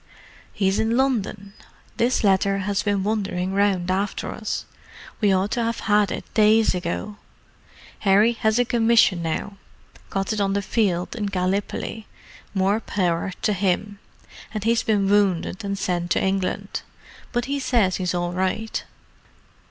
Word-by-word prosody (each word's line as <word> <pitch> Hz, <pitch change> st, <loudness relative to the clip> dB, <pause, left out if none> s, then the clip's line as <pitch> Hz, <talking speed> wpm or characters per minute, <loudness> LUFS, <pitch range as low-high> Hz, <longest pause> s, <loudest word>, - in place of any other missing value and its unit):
"He's 195 Hz, -1 st, +1 dB
in 225 Hz, +2 st, +1 dB
London—this 230 Hz, -1 st, -2 dB
letter 195 Hz, 0 st, +3 dB
has 205 Hz, -1 st, 0 dB
been 200 Hz, -2 st, 0 dB
wandering 195 Hz, -3 st, -1 dB
round 195 Hz, -3 st, +1 dB
after 195 Hz, +2 st, -2 dB
us. -, -, -4 dB, 0.5 s
We 205 Hz, -3 st, +3 dB
ought 190 Hz, +2 st, +1 dB
to 240 Hz, -, 0 dB
have 230 Hz, 0 st, -2 dB
had 210 Hz, -2 st, +2 dB
it -, -, -4 dB
days 215 Hz, +1 st, +4 dB
ago. 180 Hz, +4 st, -4 dB, 0.8 s
Harry 205 Hz, +3 st, +4 dB
has 220 Hz, -1 st, +1 dB
a 245 Hz, -, +3 dB
commission 225 Hz, -6 st, +3 dB
now—got 195 Hz, +3 st, -5 dB
it 215 Hz, -, -1 dB
on 195 Hz, -1 st, +1 dB
the 200 Hz, 0 st, 0 dB
field, 190 Hz, -3 st, 0 dB
in 210 Hz, -3 st, -2 dB
Gallipoli, 200 Hz, +3 st, -2 dB, 0.5 s
more 195 Hz, +3 st, +2 dB
power 185 Hz, -4 st, -1 dB
to 215 Hz, -, +2 dB
him: 200 Hz, +1 st, -1 dB, 0.6 s
and 210 Hz, -, -2 dB
he's 230 Hz, +1 st, +2 dB
been 205 Hz, -3 st, +1 dB
wounded 195 Hz, -1 st, +1 dB
and 200 Hz, 0 st, -2 dB
sent 175 Hz, -2 st, -1 dB
to -, -, +2 dB
England. 190 Hz, -1 st, -1 dB, 0.5 s
But 240 Hz, -1 st, -1 dB
he 280 Hz, +1 st, -2 dB
says 230 Hz, -8 st, +2 dB
he's 180 Hz, -1 st, -1 dB
all 175 Hz, 0 st, -1 dB
right." 190 Hz, +5 st, -2 dB
200 Hz, 145 wpm, -23 LUFS, 190-220 Hz, 0.8 s, days